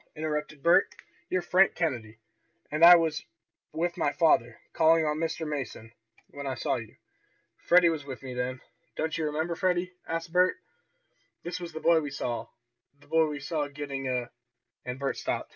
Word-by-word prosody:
interrupted 150 -2 -4
Bert. 170 +3 +5 0.4
"You're 185 -1 0
Frank 185 +3 +4
Kennedy, 120 -10 -2 0.5
and 150 +2 0
I 175 +1 +11
was 160 -2 0 0.5
with 170 +2 -2
my 145 - +2
father, 145 -8 +2
calling 160 0 +4
on 150 0 -1
Mr. 165 0 -2
Mason, 130 -6 -5 0.4
when 140 0 -7
I 130 - -2
saw - - -1
you. 110 -2 -9 0.7
Freddie 175 -1 +6
was 155 -3 -4
with 135 -1 -8
me 130 -1 -6
then. 125 +1 -3 0.3
Don't 160 0 -2
you 160 - -1
remember, 160 +3 -1
Freddie?" 180 0 0
asked 165 0 -4
Bert. 180 +1 +3 0.9
"This 175 +1 -5
is 175 - -6
the 160 - -6
boy 165 -1 +4
we 145 - -4
saw 120 -3 -4 0.5
the - - -21
boy 160 +1 +3
we 150 -1 -5
saw 150 0 -2
getting 140 -2 -5
a 125 -1 -2 0.3
" - - -52
And 125 0 -4
Bert 140 0 -2
stopped. - - -3
155 Hz, 175 wpm, -28 LUFS, 135-170 Hz, 0.9 s, I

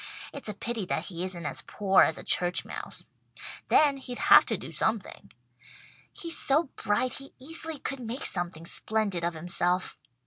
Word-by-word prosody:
It's 280 -6 -5
a 210 - -4
pity 225 +1 -4
that 160 - -2
he 175 -2 -5
isn't 180 -3 -5
as - - +1
poor 195 -2 +2
as 160 - +3
a - - -9
church 180 0 +2
mouse. - - -8 0.7
Then 290 -2 +4
he'd 250 -2 -7
have - - +6
to - - -1
do - - -9
something. 220 -3 -3 0.8
He's 335 -1 -1
so 285 +1 +2
bright 225 +6 0
he 275 - -9
easily 320 +3 -3
could 275 0 -5
make 245 +2 -4
something 175 -2 +1
splendid 200 -2 +1
of 170 0 -1
himself. 175 +2 0
210 Hz, 170 wpm, -28 LUFS, 175-270 Hz, 0.8 s, have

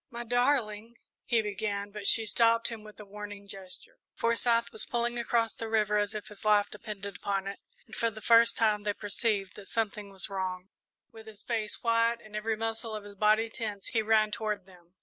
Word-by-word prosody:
"My 235 0 -5
darling," 235 -2 +1 0.3
he 230 -2 +2
began, 205 0 -3
but 205 -1 -3
she 225 - +4
stopped 230 +1 +3
him 225 -2 -7
with 215 0 -13
a 210 - -9
warning 205 0 -8
gesture. 195 -2 -11 0.2
Forsyth 235 0 +2
was 445 - 0
pulling 240 0 0
across 230 -1 +1
the 225 - -5
river 210 -1 +2
as 205 +1 -1
if 210 - -4
his 210 - -8
life 210 -1 +4
depended 205 -2 -6
upon 195 -1 -1
it, 200 0 -5 0.3
and 220 - -11
for 230 - +1
the 215 -1 -10
first 230 +2 +5
time 215 -2 +3
they 205 0 -1
perceived 205 -1 -1
that 200 - -9
something 210 -2 -2
was 195 -1 -2
wrong. 185 -2 -3 0.4
With 220 0 -13
his 215 -1 -12
face 220 -3 -3
white 230 0 +3
and 215 -2 -12
every 215 +1 -1
muscle 225 0 -3
of 210 - -5
his 205 0 -10
body 215 +2 +3
tense, 210 -4 -5
he 225 - +1
ran 215 -1 +3
toward 210 -4 -2
them. 180 -1 -20
215 Hz, 205 wpm, -30 LUFS, 205-230 Hz, 0.4 s, first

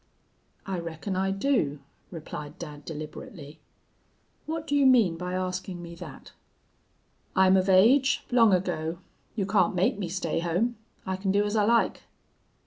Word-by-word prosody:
"'I 190 -2 -3
reckon 170 +3 -5
I 190 +1 0
do,' 195 - 0 0.3
replied 150 -2 -8
dad, 150 -4 -9
deliberately. 155 0 -8 0.9
'What 320 0 -3
do 290 - -1
you 280 -2 +5
mean 230 -10 +5
by 180 +2 -5
askin' 185 0 -3
me 170 0 -9
thet?' - - -11 1.0
"'I'm 190 0 +5
of 190 +1 +2
age, 255 +9 +4
long 230 -3 +5
ago. 175 -3 -1 0.4
You 200 -4 -1
can't 190 -3 +2
make 185 +3 +1
me 185 -4 -3
stay 170 -2 -2
home. 180 +8 0 0.3
I 190 0 -2
can 190 0 -1
do 205 +1 +2
as 205 +1 -2
I 210 -1 +3
like.' 235 +1 +2
185 Hz, 150 wpm, -27 LUFS, 170-210 Hz, 1.0 s, you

